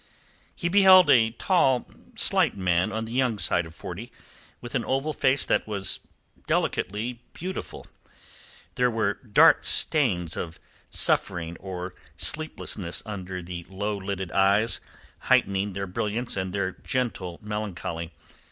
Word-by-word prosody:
He 175 - -2
beheld 185 -3 +7
a 115 -4 +5
tall, 130 - +2 0.3
slight - - +3
man 90 +2 +1
on 110 +2 -3
the 110 - -8
young 125 -3 +1
side 85 -3 +1
of 80 - -14
forty, 100 +9 -8 0.5
with 120 - -8
an 125 - 0
oval 135 +6 -1
face 135 -1 +2
that - - +1
was 100 -3 +1 0.5
delicately 115 +5 -1
beautiful. 185 +3 -6 0.9
There 125 0 +2
were 110 -3 0
dark 105 -2 +4
stains 90 - +2
of 80 -1 -6 0.3
suffering 85 -1 +1
or 90 -1 -6 0.2
sleeplessness 110 - -2
under 95 -3 -6
the 85 0 -7
low 105 +2 -3
lidded 95 -2 -4
eyes, 100 +4 +2 0.4
heightening 100 +1 +2
their 100 +1 -3
brilliance 110 +5 -2
and 95 -1 -2
their 100 -1 -1
gentle 100 -8 -3
melancholy. 95 -6 -4
105 Hz, 130 wpm, -26 LUFS, 95-120 Hz, 0.9 s, beheld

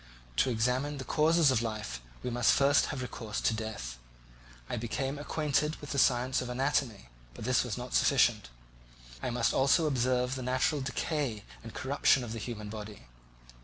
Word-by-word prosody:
To - - +3
examine 125 +5 0
the 130 - -5
causes 155 +2 +3
of 120 -3 +2
life, 105 - -4 0.2
we 125 - -2
must 120 0 +3
first 140 +1 +4
have 135 -3 -4
recourse 110 -3 -5
to - - +2
death. 105 - -5 0.7
I - - -3
became 135 +5 -3
acquainted 150 0 0
with 145 - -9
the 140 - 0
science 125 0 +3
of 125 - -5
anatomy, 125 - -1 0.3
but - - -7
this 130 0 +3
was 125 -3 -4
not 125 0 -6
sufficient; 120 - +3 0.7
I - - -2
must 120 -1 +1
also 140 +5 +3
observe 125 -2 +1
the 130 - -4
natural 130 +4 0
decay 130 -4 -2 0.2
and 115 -1 -10
corruption 135 -1 +2
of 115 -2 -5
the 115 - -5
human 105 -1 -6
body. 105 -1 -8
125 Hz, 170 wpm, -30 LUFS, 115-140 Hz, 0.7 s, first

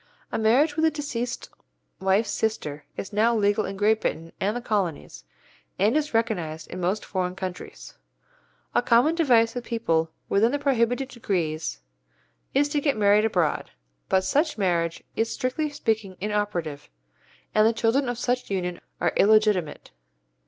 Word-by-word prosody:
A - - -1
marriage 265 +8 +3
with 320 - 0
a - - +5
deceased 260 -6 -4 0.5
wife's 195 +3 +2
sister 150 -10 -2
is 195 - -6
now 225 +3 +3
legal 205 0 +2
in 195 0 -6
Great 215 +2 +3
Britain 165 +1 -3
and 210 +4 0
the - - -2
Colonies, 200 -9 -3 0.5
and 210 +7 +2
is 305 0 0
recognized 180 -9 -2
in 180 - -5
most 190 +4 -1
foreign 185 -2 -2
countries. 185 -2 -7 0.8
A - - +3
common 245 +6 +4
device 245 -9 +3
with 245 -1 -4
people 165 -10 0 0.2
within 220 +4 +3
the - - +2
prohibited 265 -2 +1
degrees 160 - -2 0.7
is 285 +1 +4
to 290 0 0
get 280 -4 +1
married 210 +1 +4
abroad, 175 -8 0 0.4
but 190 0 +3
such 290 - +1
marriage 170 -4 0
is 225 0 0
strictly 280 +4 -1
speaking 220 -9 -2
inoperative, 185 -8 -2 0.6
and 215 0 +5
the - - +4
children 235 +4 +1
of 245 - -3
such 245 +1 -1
union 180 -3 -2 0.2
are 175 - +1
illegitimate. 210 - +3
215 Hz, 150 wpm, -25 LUFS, 185-245 Hz, 0.8 s, a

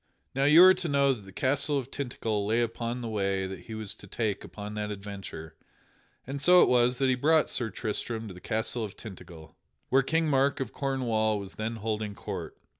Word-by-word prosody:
Now 135 +1 +1
you 155 +5 +8
are 185 0 +9
to 180 -3 -4
know 140 -1 +3
that 105 -6 -10
the 95 - -12
castle 140 +7 +1
of 135 -1 -4
Tintagel 115 -6 -2
lay 115 +3 +2
upon 120 +1 -3
the 120 - -4
way 100 -3 -1
that 95 0 -7
he 110 - -7
was 110 -2 -4
to 100 - -13
take 105 0 -2
upon 105 0 -8
that 105 0 -3
adventure, 100 -6 -7 0.7
and 140 +2 -5
so 180 +3 +7
it - - +3
was 125 0 +3
that 135 - +2
he 130 - +4
brought 155 +5 +3
Sir 115 -3 0
Tristram 110 0 -3
to 95 - -8
the 90 - -12
castle 110 +2 -2
of 105 -1 -7
Tintagel, 85 -7 -11 0.3
where 135 +1 +5
King 160 +4 +1
Mark 140 -1 +2
of 130 -4 -4
Cornwall 115 -6 0
was 100 -1 -7
then 110 +2 -3
holding 110 -1 -3
court. - - -6
115 Hz, 210 wpm, -28 LUFS, 105-135 Hz, 0.7 s, are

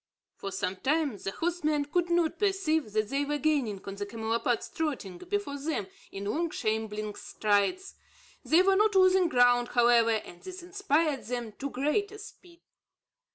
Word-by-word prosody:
For 195 - -6
some 190 -1 -2
time, 290 - 0
the 195 - -4
horsemen 305 - -1
could 345 +4 0
not 340 -2 +1
perceive 380 - +1
that 215 -1 0
they 275 +2 0
were 295 +1 -1
gaining 270 -10 0
on 195 - -5
the 205 - -3
camelopards 225 +2 -1
trotting 260 - -3
before 385 -7 -3
them 290 -8 -2 0.3
in 195 +1 -6
long 330 +11 -1
shambling 215 -3 -2
strides. 210 - 0 0.5
They 340 +3 +4
were 385 0 +4
not 425 0 +3
losing 370 -1 +5
ground, 245 -2 +4
however, 240 -1 +4
and 215 -6 -3
this 370 -1 -9
inspired 325 -6 0
them 240 -2 -4
to 280 - -3
greater 390 +11 -1
speed. 360 -5 -14
285 Hz, 155 wpm, -29 LUFS, 220-345 Hz, 0.5 s, losing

